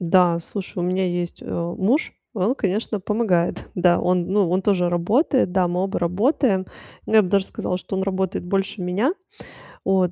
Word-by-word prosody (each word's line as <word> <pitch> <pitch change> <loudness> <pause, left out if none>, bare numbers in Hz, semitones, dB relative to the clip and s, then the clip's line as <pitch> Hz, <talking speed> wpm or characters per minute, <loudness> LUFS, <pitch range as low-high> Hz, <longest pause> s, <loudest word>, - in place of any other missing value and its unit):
Да, 175 -1 +3
слушай, 190 +1 -7
у - - 0
меня 185 +1 0
есть, 175 -1 -3
а, 170 0 -3
муж, 235 - +1 0.2
и - - -5
он, 210 +8 +2
конечно, 210 +2 -1
помогает, 195 -4 0
да. 175 -1 +4
Он, 180 -1 +1
ну, 195 -3 +2
он 185 +2 +2
тоже 185 -3 +2
работает, 195 - +2
да, 185 -2 +2
мы 180 +1 -1
оба 195 - -2
работаем, 190 - +1 0.4
но 220 - -2
я 215 - +8
бы 185 - -3
даже 195 0 +2
сказала, 180 - -3
что 190 - -7
он 190 - 0
работает 190 -2 -2
больше 195 +1 -2
меня, 200 - +1 0.7
вот 185 -2 +2
185 Hz, 190 wpm, -22 LUFS, 180-205 Hz, 0.7 s, я